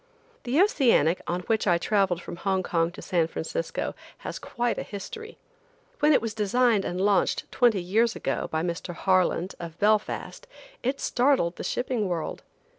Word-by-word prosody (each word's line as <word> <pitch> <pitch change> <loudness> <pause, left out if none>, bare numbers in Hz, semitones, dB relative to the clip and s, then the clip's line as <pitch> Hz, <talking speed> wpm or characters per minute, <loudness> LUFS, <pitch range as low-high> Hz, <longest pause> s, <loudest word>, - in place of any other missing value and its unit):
The 255 +5 +1
Oceanic, 245 - +4
on 175 +1 -1
which 220 +2 0
I 175 -2 +4
traveled 185 -1 +1
from - - -7
Hong 190 0 0
Kong 165 -1 +1
to 205 - -10
San 170 -3 +1
Francisco, - - -3 0.3
has - - -4
quite 240 0 -2
a - - -2
history. 445 - -8 0.6
When 300 +1 +4
it 280 - +4
was 225 -2 -2
designed 220 0 +2
and 180 - -3
launched 200 0 +2
twenty 230 -7 +3
years 225 +6 +2
ago - - -2
by 160 0 -1
Mr. 175 0 -4
Harland, 185 0 +1
of 170 -1 -7
Belfast, 215 - 0 0.3
it 265 +3 -1
startled 245 -9 +2
the - - -5
shipping 245 -4 -1
world. 170 -3 -3
205 Hz, 165 wpm, -26 LUFS, 175-245 Hz, 0.6 s, Oceanic